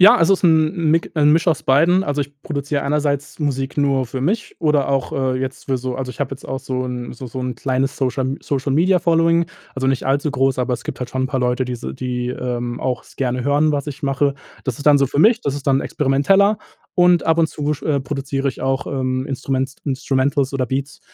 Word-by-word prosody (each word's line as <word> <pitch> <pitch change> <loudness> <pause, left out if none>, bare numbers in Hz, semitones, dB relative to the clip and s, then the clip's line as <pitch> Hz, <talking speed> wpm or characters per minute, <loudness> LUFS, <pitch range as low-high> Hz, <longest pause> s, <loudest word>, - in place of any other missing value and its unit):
Ja, 195 +3 +9
also, 170 +4 +4
ist 190 - +1
'n 160 0 +4
'n 165 -3 +1
Mik 165 +1 +1
'n 150 -1 +4
Misch 165 +2 +2
aus 160 -4 +2
beiden, 170 +8 +4
also, 145 -4 -1
ich 140 +1 -10
produziere 145 -1 -2
einerseits 145 0 -1
Musik 135 -3 -2
nur 140 -3 +2
für 125 +2 -5
mich 210 - -1
oder 150 -3 +2
auch, 135 -1 0
äh, 130 -1 0
jetzt 130 0 -5
für 135 - +1
so 130 0 -4
also, 130 -1 -4
ich - - -12
habe 140 -1 -2
jetzt 135 - -9
auch 135 - -2
so 130 -1 -3
'n 125 -1 -5
so 130 +1 -8
so 130 - -6
'n 125 -1 -3
kleines 130 +2 -1
Social 130 0 -1
Social 140 -1 -2
Media 180 +5 +4
Following, 165 0 +3 0.3
also, 130 0 -1
nicht 135 -1 +1
allzu 140 +3 +1
groß, 135 -1 +1
aber 125 0 0
es 120 - -8
gibt - - -6
halt 125 -1 -5
schon 130 0 -1
'n - - +1
paar 135 - -1
Leute, 125 +1 +1
die 125 -1 -4
se 65 - -6
die, 125 - -3
ähm, 120 -1 -3
auch 125 -2 -2
es - - -19
gerne 125 -1 -1
hören, 145 +2 +3
was 145 0 -1
ich 145 0 -7
mache. 140 0 +1 0.3
Das 130 -4 -2
ist 140 - -9
dann 145 -1 +7
so 140 - +3
für 140 +3 0
mich, 225 +4 +5
das 140 - -2
ist 145 -1 -7
dann 135 0 +3
experimenteller 195 +10 +2 0.4
und 175 -1 +4
ab 160 0 +2
und 165 - +5
zu 150 0 -2
sch 145 - -7 0.2
produziere 135 0 -2
ich 130 - -5
auch, 135 0 -1
ähm, 130 -1 -1
Instruments 135 0 -2
Instrumentals 135 0 0
oder 130 -2 -1
Beats 135 +3 -3
135 Hz, 240 wpm, -20 LUFS, 130-150 Hz, 0.4 s, Ja